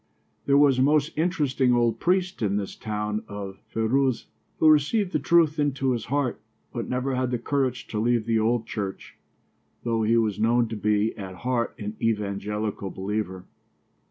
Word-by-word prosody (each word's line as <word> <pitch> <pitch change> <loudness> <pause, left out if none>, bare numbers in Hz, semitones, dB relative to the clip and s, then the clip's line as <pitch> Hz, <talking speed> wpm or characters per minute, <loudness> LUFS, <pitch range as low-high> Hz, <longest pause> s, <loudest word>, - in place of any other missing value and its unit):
There 140 0 +5
was 140 -3 +5
a - - +4
most 150 +3 +2
interesting 145 -7 +1
old 115 -2 +1
priest 180 -1 0
in 100 -2 +1
this 100 -1 -4
town 105 0 -3
of 100 -1 -7
Feiruzeh 125 +3 +1 0.3
who 160 - +4
received 155 +7 +3
the - - +1
truth 160 +1 +3
into 135 -2 +1
his 120 -2 -2
heart, 140 -1 -1 0.3
but - - -4
never 130 +1 -1
had 130 -1 0
the 125 - 0
courage 130 0 -1
to 105 - -2
leave 115 0 +1
the 115 -1 +2
old 115 +1 +1
church, 100 -3 -6 0.6
though 115 -1 0
he 110 +2 +3
was 110 -4 +1
known 115 +2 +3
to 115 - -4
be 105 +1 +1
at 95 -2 -7
heart 120 +2 -1
an 105 0 -6
evangelical 105 -1 -2
believer. 95 -1 -4
120 Hz, 170 wpm, -25 LUFS, 105-135 Hz, 0.6 s, There